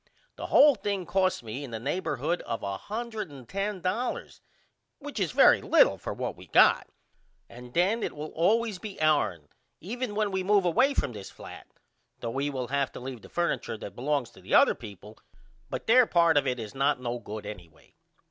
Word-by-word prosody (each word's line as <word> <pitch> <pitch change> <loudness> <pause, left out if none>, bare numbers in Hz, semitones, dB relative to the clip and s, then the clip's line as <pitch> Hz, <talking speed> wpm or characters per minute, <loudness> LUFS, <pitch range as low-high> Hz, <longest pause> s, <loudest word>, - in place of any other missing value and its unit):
The - - -6
hole 290 0 +7
thing 200 -4 -3
cost 185 -7 +1
me 115 +5 -6
in 140 - -7
the 115 -1 -5
neighborhood 155 +3 -2
of 115 - -3
$110 200 - -4 0.6
which 290 -5 -7
is 180 -6 0
very - - +6
little - - +4
for - - -5
what - - -4
we - - -14
got - - +5 0.6
and 125 +1 -12
then 195 +7 +2
it - - -3
will 150 +1 -6
always 210 +4 +1
be 210 -1 -8
ourn 125 - +1 0.3
even 225 +4 -4
when 210 -1 0
we 190 0 -1
move 200 0 +3
away 255 - +3
from - - 0
this 100 -3 -8
flat - - -11 0.5
though 115 - -4
we 140 +4 -1
will 130 -3 -4
have 140 -1 0
to - - -7
leave 125 -2 -7
the - - -14
furniture 170 -9 -2
that 100 -2 -9
belongs 135 -2 -1
to 95 - -17
the 95 - 0
other - - +6
people 105 -1 -12 0.5
but - - -5
their 245 +1 +6
part 170 -2 +4
of 145 -1 +3
it 125 -1 0
is 110 -3 -7
not 135 0 +1
no 120 -1 -3
good 105 -1 -8
anyway. 90 -6 -11
150 Hz, 185 wpm, -28 LUFS, 120-200 Hz, 0.6 s, hole